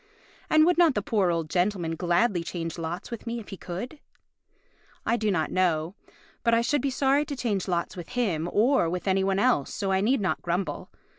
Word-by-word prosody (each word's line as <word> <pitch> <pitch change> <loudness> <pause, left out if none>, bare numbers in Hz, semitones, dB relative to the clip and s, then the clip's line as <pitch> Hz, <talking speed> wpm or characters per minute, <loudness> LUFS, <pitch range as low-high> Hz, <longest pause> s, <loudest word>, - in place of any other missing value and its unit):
And 310 0 +6
would 355 0 +3
not 330 -5 +5
the 205 - -1
poor 200 -5 +1
old 165 -2 -1
gentleman 175 -1 0
gladly 175 +2 +1
change 165 -1 -5
lots 165 +7 -5
with 235 0 -7
me, 235 +1 -2
if 220 - -11
he - - -6
could? 215 - -6 1.1
I 230 - +2
do 215 -3 0
not 160 -6 0
know; 175 -2 +1 0.5
but 230 0 +3
I 230 - +3
should 265 +4 +1
be 275 - 0
sorry 275 +2 +2
to 300 -2 -5
change 215 -7 -2
lots 175 -2 -1
with 175 -3 -8
him 175 -9 0
or 230 -4 +3
with 180 +3 -4
any 190 0 +2
one 195 0 +1
else, 205 - +2
so 195 -2 -2
I 190 0 +2
need 245 +6 +2
not 190 -3 -1
grumble. 175 -3 -3
195 Hz, 210 wpm, -26 LUFS, 175-235 Hz, 1.1 s, And